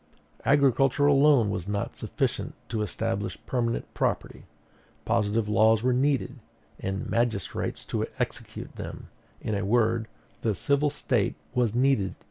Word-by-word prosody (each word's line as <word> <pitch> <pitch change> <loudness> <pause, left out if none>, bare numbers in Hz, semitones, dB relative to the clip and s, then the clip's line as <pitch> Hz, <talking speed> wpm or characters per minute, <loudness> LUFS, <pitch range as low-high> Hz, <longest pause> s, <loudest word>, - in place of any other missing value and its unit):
"Agriculture 135 0 +4
alone 140 -6 +5
was 90 -2 -3
not 100 0 -2
sufficient - - -2
to 110 -2 -1
establish 100 -1 -2
permanent 120 -2 -1
property; - - -2 0.6
positive 110 -1 +1
laws 110 +1 +4
were 125 0 +3
needed, 135 0 +1 0.4
and 95 +1 -3
magistrates 115 -5 -1
to - - -2
execute - - -5
them; - - -7 0.3
in 110 - -2
a 100 0 -1
word, 115 +1 +2 0.3
the 110 -3 0
civil 140 +7 +2
State - - 0 0.2
was 120 -3 +1
needed. 125 -6 +2
115 Hz, 125 wpm, -27 LUFS, 105-135 Hz, 0.6 s, alone